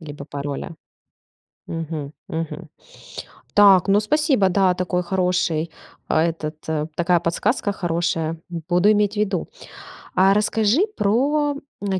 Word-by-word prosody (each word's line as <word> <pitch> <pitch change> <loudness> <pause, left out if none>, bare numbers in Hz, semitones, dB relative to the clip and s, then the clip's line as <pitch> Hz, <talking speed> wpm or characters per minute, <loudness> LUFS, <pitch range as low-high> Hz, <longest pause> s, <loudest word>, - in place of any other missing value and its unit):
Либо 145 -3 -9
пароля? 145 +3 -5 0.9
Мгм. 160 -3 -5 0.2
Мгм. 165 +1 -5 0.9
Так, 200 -2 +6
ну 200 +1 +5
спасибо. 270 - +2
Да, 185 -1 +3
такой 180 0 -1
хороший, 175 -3 0 0.4
а, - - -1
этот, 155 -2 -3
э 155 -1 -1
такая 175 0 +2
подсказка 200 +6 0
хорошая, 165 -2 -1 0.3
буду 180 +4 +4
иметь 210 0 +1
ввиду. 205 -4 -1 0.7
А 190 +2 +5
расскажи 220 - +2
про, 285 +8 +1 0.3
м, 190 -2 -1
180 Hz, 115 wpm, -22 LUFS, 165-205 Hz, 0.9 s, Так